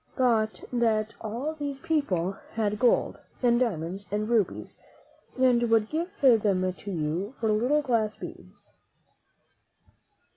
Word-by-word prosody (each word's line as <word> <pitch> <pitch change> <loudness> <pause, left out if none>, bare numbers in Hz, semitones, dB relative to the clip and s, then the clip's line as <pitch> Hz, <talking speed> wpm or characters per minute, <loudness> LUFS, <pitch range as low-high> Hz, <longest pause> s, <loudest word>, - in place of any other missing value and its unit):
thought 225 -4 +1
that 225 -2 +1
all 235 +8 -3
these 285 -3 -5
people 280 - 0 0.2
had 210 -2 -1
gold 245 -1 +2 0.2
and 240 -1 +4
dia 250 -2 +3
monds 180 +6 -6
and 210 +1 -1
rubies, 225 -6 -1 0.6
and 255 -2 +4
would 225 -1 +3
give 330 +3 -1
them 205 -8 +3
to 200 - -10
you 175 - -2
for 220 -2 +1
little 250 +8 +2
glass 225 -5 0
beads. - - -11
225 Hz, 125 wpm, -27 LUFS, 205-255 Hz, 0.6 s, and